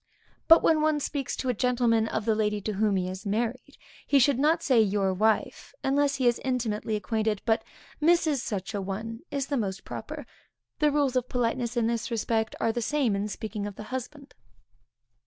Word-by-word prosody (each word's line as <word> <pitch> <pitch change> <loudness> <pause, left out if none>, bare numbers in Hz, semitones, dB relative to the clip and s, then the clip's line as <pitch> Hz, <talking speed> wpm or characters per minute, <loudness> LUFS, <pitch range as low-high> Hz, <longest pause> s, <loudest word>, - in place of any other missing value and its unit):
But 330 0 +8
when 315 -1 +4
one 310 -1 +2
speaks 280 -1 -3
to 260 - -3
a - - +2
gentleman 235 -1 +2
of 220 -1 -3
the 225 - +3
lady 210 -1 0
to 215 +2 -3
whom 205 0 +1
he 185 -1 0
is 185 +1 -6
married, 235 +6 -3 0.3
he 285 - +4
should 270 0 +4
not 320 +4 +2
say 250 -5 +4
your 195 -2 +1
wife, 215 - 0
unless 280 +1 +2
he 260 - -1
is 240 - +2
intimately 225 -4 -1
acquainted, 215 0 -1
but 225 -1 +2 0.4
Mrs. 320 -2 +3
such 205 -5 -4
a 200 - -2
one, 220 +4 -5
is 280 -2 -2
the 280 0 -2
most 195 -4 -3
proper. - - -7 0.5
The 300 -2 +4
rules 285 -3 +1
of 255 0 0
politeness 240 0 -1
in 235 - +2
this 235 +1 -1
respect, 225 -1 -1
are 225 - +2
the 240 +1 -3
same 260 -4 +1
in 200 +1 -1
speaking 210 -1 -5
of 205 - -8
the 215 - -8
husband. 275 +3 -6
230 Hz, 195 wpm, -27 LUFS, 215-270 Hz, 0.5 s, But